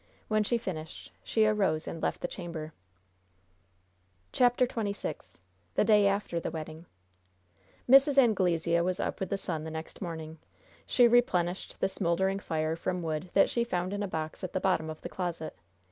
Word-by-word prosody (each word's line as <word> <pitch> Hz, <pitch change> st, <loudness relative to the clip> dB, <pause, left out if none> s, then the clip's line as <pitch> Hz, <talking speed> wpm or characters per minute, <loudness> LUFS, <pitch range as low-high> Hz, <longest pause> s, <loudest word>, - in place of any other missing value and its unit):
When 215 Hz, -1 st, +3 dB
she 235 Hz, +3 st, +1 dB
finished, 160 Hz, -8 st, -6 dB
she 220 Hz, -1 st, +2 dB
arose 195 Hz, -7 st, +1 dB
and 165 Hz, -, -5 dB
left -, -, -1 dB
the -, -, -1 dB
chamber. 165 Hz, -4 st, -7 dB, 1.6 s
CHAPTER 245 Hz, 0 st, +4 dB
XXVI 210 Hz, -4 st, -4 dB, 0.4 s
THE -, -, +4 dB
DAY 210 Hz, -2 st, +5 dB
AFTER 200 Hz, -4 st, 0 dB
THE -, -, -3 dB
WEDDING 160 Hz, +1 st, -7 dB, 1.0 s
Mrs. 275 Hz, +2 st, +6 dB
Anglesea 175 Hz, -9 st, +3 dB
was 180 Hz, +1 st, -1 dB
up -, -, -2 dB
with 190 Hz, -, -3 dB
the 200 Hz, -, 0 dB
sun 165 Hz, -5 st, -4 dB
the 160 Hz, -, -5 dB
next 160 Hz, +4 st, -7 dB
morning. 160 Hz, -3 st, -6 dB, 0.5 s
She 245 Hz, -1 st, +5 dB
replenished 185 Hz, -7 st, +1 dB
the -, -, +3 dB
smoldering 190 Hz, +1 st, 0 dB
fire 160 Hz, -3 st, -1 dB
from 180 Hz, +1 st, -3 dB
wood 160 Hz, +2 st, -3 dB
that 195 Hz, -, +6 dB
she 235 Hz, -, +1 dB
found 185 Hz, -4 st, -2 dB
in 205 Hz, -, -2 dB
a 205 Hz, -, -1 dB
box 160 Hz, 0 st, -5 dB
at 185 Hz, -, -4 dB
the -, -, 0 dB
bottom 180 Hz, -4 st, +1 dB
of 155 Hz, -, -7 dB
the -, -, -6 dB
closet. 175 Hz, -3 st, -4 dB
180 Hz, 170 wpm, -30 LUFS, 160-205 Hz, 1.6 s, Mrs